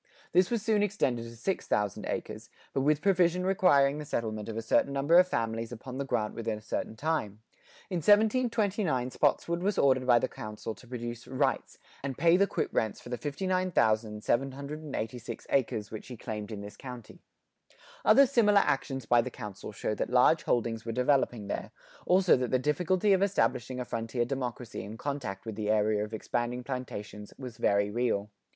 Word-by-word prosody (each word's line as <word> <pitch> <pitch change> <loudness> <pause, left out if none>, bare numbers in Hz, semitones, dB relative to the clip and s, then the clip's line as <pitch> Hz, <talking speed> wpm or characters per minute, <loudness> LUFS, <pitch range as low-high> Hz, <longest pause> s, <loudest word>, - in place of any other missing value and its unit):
This 180 +1 +4
was 235 -3 -1
soon 215 -2 +2
extended 135 - 0
to 115 0 -10
six 190 +11 -2
thousand 105 -2 -1
acres, - - -5 0.2
but 135 - +1
with 150 +2 +2
provision 180 -2 +3
requiring 150 -7 +4
the 150 - -6
settlement 110 -5 -3
of 110 - -5
a - - -1
certain 125 +4 +2
number 145 +5 +5
of 180 - +5
families 115 -5 -2
upon 125 +3 -7
the 140 - -2
grant 115 -5 -1
within 115 -2 -3
a - - -11
certain 110 - -3
time. 110 -7 -2 0.5
In 180 - -2
1729 205 - +2
Spotswood 170 +5 +1
was 200 +2 0
ordered 130 -2 +3
by 120 -1 +6
the - - +1
Council 105 +1 -6
to 110 +4 -17
produce 120 -1 -6
"rights" 135 0 -1 0.2
and 135 -2 -4
pay 165 +3 +5
the 200 +2 +4
quit - - -2
rents 110 -2 0
for - - -11
the 125 - -3
59,786 135 - -1
acres 110 -6 0
which 110 - -7
he 125 - -8
claimed 105 -1 -6
in 105 -2 -5
this 100 +1 -9
county. 125 -4 -10 0.8
Other 275 - +7
similar 215 -6 +4
actions 135 -4 -1
by 120 +1 +4
the 130 - -4
Council 105 -4 -8
show 105 - -2
that - - -2
large 125 +6 +4
holdings 115 -4 -1
were 115 - -4
developing 125 -3 +1
there, 100 - -4 0.4
also 185 0 +5
that 125 -1 -1
the 130 - +3
difficulty 180 +9 +2
of 190 - +2
establishing 130 - 0
a 125 - -3
frontier 115 +1 -2
democracy 125 -4 -4
in 105 +3 -8
contact 125 -8 -4
with 110 - -4
the 105 0 -3
area 105 -1 +2
of 105 - -6
expanding 120 +2 -2
plantations, 105 -5 -6
was 125 -4 -8
very 100 0 +2
real. 105 -3 -1
125 Hz, 180 wpm, -29 LUFS, 110-160 Hz, 0.8 s, Other